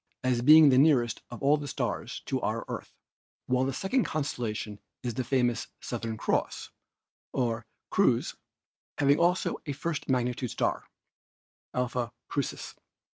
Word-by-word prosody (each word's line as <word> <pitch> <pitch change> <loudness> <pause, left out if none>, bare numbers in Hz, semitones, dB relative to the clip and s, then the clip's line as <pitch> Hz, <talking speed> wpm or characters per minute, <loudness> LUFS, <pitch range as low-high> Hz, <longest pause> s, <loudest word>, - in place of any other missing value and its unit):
as 125 -2 +1
being 155 +3 +9
the 130 -1 +5
nearest 125 -6 +3
of 120 - -9
all 145 +2 +5
the 145 -1 -6
stars - - -3
to - - -1
our - - -2
Earth, - - -6 0.5
while 125 +1 +2
the 135 - 0
second 195 - +1
constellation 115 -8 -3 0.2
is 120 -2 -2
the 130 - -2
famous 120 -1 +1
Southern 115 -2 -4
Cross, - - -1 0.6
or 115 -2 -1 0.2
Crux, - - +2 0.6
having 140 +1 +4
also 175 +2 +2
a 145 - -1
first 150 +1 -4
magnitude 125 -1 0
star, - - -1 0.9
Alpha 125 -1 -1 0.2
Crucis. 140 -3 -3
130 Hz, 135 wpm, -29 LUFS, 120-145 Hz, 0.9 s, being